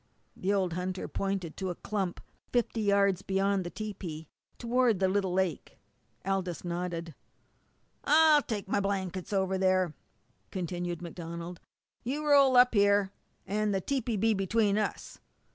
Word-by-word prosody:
The 190 - -1
old 190 -4 +1
hunter 180 +1 -3
pointed 195 -4 -3
to 190 -1 -3
a 175 - -3
clump 195 -3 -3 0.3
fifty 240 -2 0
yards 200 -2 +3
beyond 195 0 +1
the 175 - -5
tepee 180 -7 -6 0.3
toward 240 -2 +2
the 190 +1 +2
little 190 -1 0
lake. 180 -5 -2 0.5
Aldous 185 -3 -2
nodded. 170 -1 -3 0.9
"I'll 310 -1 +6
take 215 -8 -4
my 200 - +1
blankets 190 -2 -2
over 190 -1 0
there," 185 -3 +2 0.6
continued 175 -1 -4
MacDonald. 170 0 -7 0.4
"You 285 +5 -3
roll 285 -2 +6
yourself 250 -1 +8
up - - -19
here, 200 -1 +3 0.3
and 210 +1 0
the - - +1
tepee'll 240 +1 -1
be 225 +3 +3
between 205 +1 +1
us. 210 - -4
195 Hz, 145 wpm, -30 LUFS, 180-210 Hz, 0.9 s, yourself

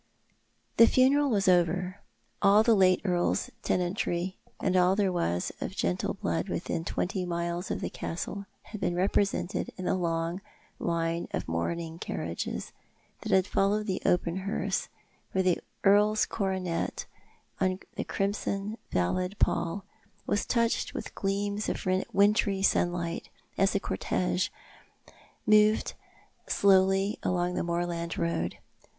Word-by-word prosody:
The 230 - +9
funeral 275 +4 +4
was 200 -5 +1
over. 180 +1 +2 0.4
All 205 +2 +6
the 230 - +5
late 185 -3 +4
earl's 175 -2 +1
tenantry 180 0 -1 0.2
and 185 -1 0
all 180 +1 +4
that 205 - +2
there 190 - +2
was 130 - -1
of - - -4
gentle 90 +1 -1
blood - - -2
within 165 - -2
twenty 185 +3 -2
miles 170 0 -2
of - - -2
the - - -2
castle 200 +4 -5 0.2
had 215 - -9
been 175 - 0
represented 195 +1 0
in 185 - -5
the - - +2
long 170 0 -1 0.4
line 170 0 -1
of - - -4
mourning 165 - -3
car - - -4
riages - - -4 0.5
that 190 -1 +3
followed 205 +2 +1
the 190 -3 -2
open 175 0 +1
hearse, 195 +2 -2 0.5
where 190 - +2
the 180 -2 +2 0.2
earl's 210 +2 +5
coronet, 190 -4 -2 0.5
on 185 -1 +1 0.2
the - - -2
crimson 200 +1 -2
velvet 180 - 0
pall, 185 +4 0 0.4
was 205 - 0
touched 230 -1 +1
w'ith - - -5
gleams 200 +1 -1
of - - -3 0.3
wintry 200 -1 +3
sunlight 175 -3 0 0.3
as 195 0 +2
the 200 - +2
cortege 180 -1 -1 1.0
moved 215 0 +4 0.5
slowly 195 +1 +3
along 180 0 0
the - - -1
moorland 170 0 -2
road. 130 - -1
185 Hz, 130 wpm, -29 LUFS, 175-200 Hz, 1.0 s, The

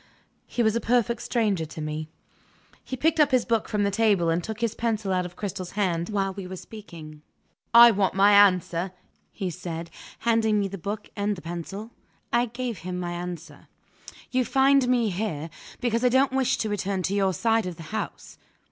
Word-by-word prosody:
He 240 - -1
was 220 0 +2
a 235 - 0
perfect 240 -1 +1
stranger 215 -9 0
to 155 - -10
me." 155 0 -4 0.7
He 260 - -5
picked 320 +4 +1
up 295 -2 +5
his 255 -4 +2
book 230 -2 0
from 210 -1 0
the 200 - +1
table, 200 -5 +2
and 170 +1 0
took 220 +3 -6
his 230 -2 0
pencil 220 -4 -1
out 180 -1 0
of 175 - -16
Cristel's 185 -3 -5
hand, 175 -5 0
while 195 -2 -1
we 190 -1 -7
were 185 - -6
speaking. 170 -7 -11 0.5
"I 235 0 +9
want 195 -3 0
my 200 +1 +5
answer," 185 -3 +4 0.4
he 190 -4 -4
said, 170 -1 -6 0.3
handing 225 -2 +2
me 200 - 0
the 195 0 -7
book 205 +4 -5
and 205 0 -1
the 180 - -10
pencil. 175 +6 -6 0.4
I 240 +1 +3
gave 240 -3 -4
him 180 +1 -5
his 175 - -3
answer. 175 -3 -7 0.6
"You 255 0 +2
find 270 0 +3
me 240 -4 +2
here, 170 -5 -3 0.3
because 235 -1 0
I 250 - +5
don't 260 +2 +3
wish 265 -2 +1
to 220 - -2
return 195 -2 -2
to 190 - -1
your 195 -1 +2
side 225 +1 +1
of 180 - -5
the 165 - -10
house." 220 - -5
205 Hz, 195 wpm, -26 LUFS, 180-230 Hz, 0.7 s, I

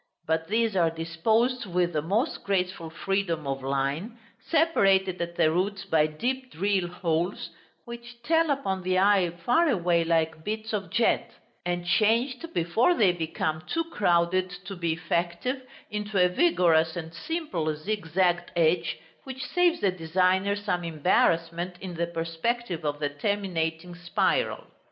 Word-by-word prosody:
But 160 0 0
these 225 0 +1
are 170 -3 +3
disposed 205 +10 0
with 175 -1 0
the 150 - 0
most 210 - -1
graceful 180 -4 -1
freedom 170 -2 -2
of 135 0 -3
line, 140 - -2 0.2
separated 195 - +2
at 170 0 -4
the 155 - +3
roots 195 +4 -1
by 155 -1 +3
deep 255 +11 -3
drill 190 +1 0
holes, 175 +1 -2 0.3
which 235 0 -10
tell 325 +4 +2
upon 230 -10 -1
the 185 0 0
eye 195 -2 +4
far 240 - +1
away 175 -7 +2
like 160 -1 0
beads 220 +2 -4
of 195 -4 -2
jet; 230 +5 +1 0.4
and 175 0 -2
changed, 240 - +1
before 225 - +2
they 200 - +4
become 160 -2 -2
too 330 - 0
crowded 185 - +2 0.2
to 195 - -6
be 170 -2 -1
effective, 175 +11 -2 0.3
into 210 -1 -3
a 180 0 +5
vigorous 170 - +3
and 165 -1 -6
simple 180 - -3
zigzagged 175 0 0
edge, 165 0 +2 0.3
which 265 -1 -6
saves 350 -1 +2
the 195 - +3
designer 185 +3 +1
some 190 -4 -2
embarrassment 170 +2 +1
in 190 -3 -6
the 170 0 -1
perspective 170 +3 -3
of 145 -1 -1
the 145 -1 -1
terminating 170 0 -2
spiral. 175 -1 0
180 Hz, 145 wpm, -27 LUFS, 165-215 Hz, 0.4 s, a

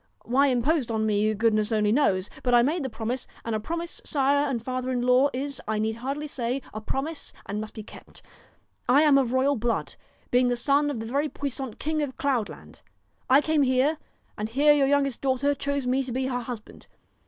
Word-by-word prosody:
Why 270 +5 +3
imposed 260 +1 +1
on 220 -1 0
me, 215 0 +2
good 225 +1 +2
ness 215 +1 0
only 210 -1 +2
knows, 205 -8 +2
but 245 -1 +2
I 240 - +6
made 315 +7 0
the 265 - -3
promise, 240 +2 -4 0.2
and 230 - -2
a 215 - 0
promise, 335 +9 -4
sire 285 0 +2
and 250 -3 -1
father 255 +2 -3
in 250 -1 -1
law, 250 +3 +4
is, 275 +1 -4
I 215 0 0
need 220 +1 -1
hardly 275 +5 -4
say, 255 -2 -3
a 215 - -5
promise 285 +7 -4
and 210 +1 -3
must 215 - -8
be 215 - -6
kept. - - -14 0.7
I 280 +5 +6
am 290 -3 +6
of 250 -3 0
royal 265 +2 +2
blood, 230 +1 -1 0.4
being 250 0 +4
the 245 - +1
son 280 +4 +2
of 275 -6 -3
the 225 - -5
very 280 +6 -1
puissant 270 -5 -5
King 310 0 -1
of 280 -3 -4
Cloud 255 -7 0
land. - - -13 0.5
I 270 +3 +6
came 310 -1 +1
here, 270 +4 +2 0.4
and 210 +1 -2
here 290 +5 +5
your 280 -2 +3
youngest 275 -2 +1
daughter 275 +1 +1
chose 280 -1 -2
me 255 +2 +1
to 260 -2 -5
be 260 +2 -1
her 250 -1 -1
husband. 240 -3 -8
260 Hz, 215 wpm, -26 LUFS, 230-285 Hz, 0.7 s, I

